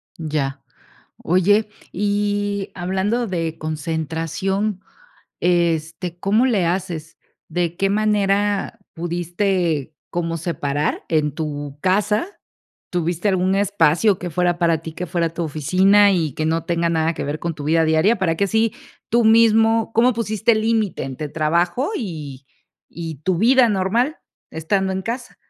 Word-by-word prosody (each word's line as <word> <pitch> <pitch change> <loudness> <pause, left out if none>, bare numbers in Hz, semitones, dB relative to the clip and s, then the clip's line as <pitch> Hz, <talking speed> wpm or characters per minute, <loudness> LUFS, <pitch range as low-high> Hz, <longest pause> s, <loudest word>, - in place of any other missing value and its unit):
Ya. 150 -4 -3 0.6
Oye, 205 +5 +3 0.2
y 205 0 -1
hablando 190 +6 -1
de 165 -4 -3
concentración, 165 +6 -2 0.6
este, 170 0 0
¿cómo 210 +7 +2
le 205 -9 +2
haces? 170 -3 -3 0.3
¿De 175 -1 -2
qué 195 +1 +1
manera 205 0 +1
pudiste 175 -2 -1 0.2
como 165 -1 -2
separar 150 -3 -2
en 155 -2 +1
tu 145 -2 -5
casa? 210 - +1 0.6
¿Tuviste 175 +2 -1
algún 190 0 +2
espacio 200 -1 +3
que 180 - -5
fuera 175 +1 0
para 170 -2 +2
ti, 160 - -7
que 180 +3 -5
fuera 170 -1 -1
tu 170 - -3
oficina 190 +7 +4
y 160 -5 0
que 155 - -2
no 165 0 0
tenga 170 0 0
nada 165 0 +1
que - - -4
ver 145 +2 -4
con 170 -1 -3
tu 145 - -8
vida 160 +2 +3
diaria? 160 +8 +3
Para 165 -4 0
que 200 - +1
así 220 +2 +1 0.4
tú 235 0 +2
mismo, 225 0 +4
¿cómo 245 +3 +4
pusiste 220 0 +1
límite 220 -2 0
entre 135 +3 -5
trabajo 170 - 0
y 150 - -6 0.5
y 165 -2 -5
tu 185 -2 +1
vida 245 +4 +5
normal, 225 - 0 0.3
estando 190 +4 -1
en 190 0 -3
casa? 245 +4 -5
180 Hz, 140 wpm, -21 LUFS, 160-205 Hz, 0.6 s, vida